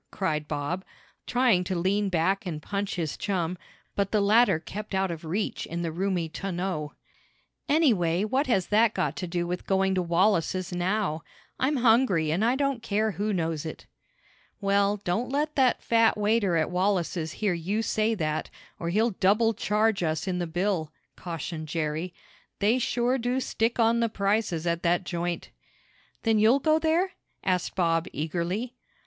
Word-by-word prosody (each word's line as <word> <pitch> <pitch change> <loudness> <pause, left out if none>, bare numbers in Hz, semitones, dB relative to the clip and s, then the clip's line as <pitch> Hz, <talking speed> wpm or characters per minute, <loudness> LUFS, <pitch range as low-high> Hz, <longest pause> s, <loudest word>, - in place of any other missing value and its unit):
cried 155 -6 -2
Bob, 155 +5 -3 0.4
trying 245 -7 +3
to 185 0 -2
lean 195 +3 +1
back 185 +3 0
and 160 -4 -3
punch 200 0 -3
his 165 -5 -2
chum, 180 -3 -1 0.4
but 200 -1 0
the 215 - +3
latter 205 -2 +4
kept 205 +4 -6
out 190 -1 +1
of 165 -1 -6
reach 185 +7 -2
in 170 +1 -4
the 165 - -2
roomy 180 0 -1
tonneau. 175 -3 -3 0.8
"Anyhow, 205 - +3
what 265 +7 0
has 195 -7 +1
that 220 +1 +3
got - - 0
to 180 - -3
do 175 0 -1
with 180 +1 -4
going 190 0 +2
to 185 - +1
Wallace's 185 +1 +1
now? 180 -2 0 0.4
I'm 275 +3 +2
hungry 225 - +3
and 180 +7 +1
I 240 +3 +3
don't 275 -3 0
care 215 -1 0
who 210 +2 -2
knows 165 -5 -1
it." 160 - -7 0.7
"Well, 200 0 +2
don't 205 +5 -2
let 295 +3 -1
that 260 -3 +2
fat 230 -1 +3
waiter 210 -3 +2
at 155 - 0
Wallace's 180 -3 0
hear 205 -4 0
you 190 +6 -1
say 220 +1 +1
that, 155 -5 -2 0.3
or 170 - -2
he'll 220 +6 +2
double 210 +4 +3
charge 210 0 +1
us 160 +1 -1
in 180 -1 -1
the 175 - -2
bill," 175 -2 -1 0.2
cautioned 165 -2 -5
Jerry. 155 +2 -2 0.5
"They 220 +5 +2
sure 245 +2 +1
do 245 +2 0
stick 235 -2 -1
on 230 +1 +4
the 230 -1 +1
prices 200 -5 0
at 170 0 0
that 175 +1 +2
joint." 175 -1 -3 0.7
"Then 225 -2 +3
you'll 225 +5 +5
go 310 +3 +2
there?" 335 +4 +1 0.3
asked 180 -2 0
Bob 165 -2 +1
eagerly. 175 - -3
195 Hz, 165 wpm, -27 LUFS, 170-220 Hz, 0.8 s, you'll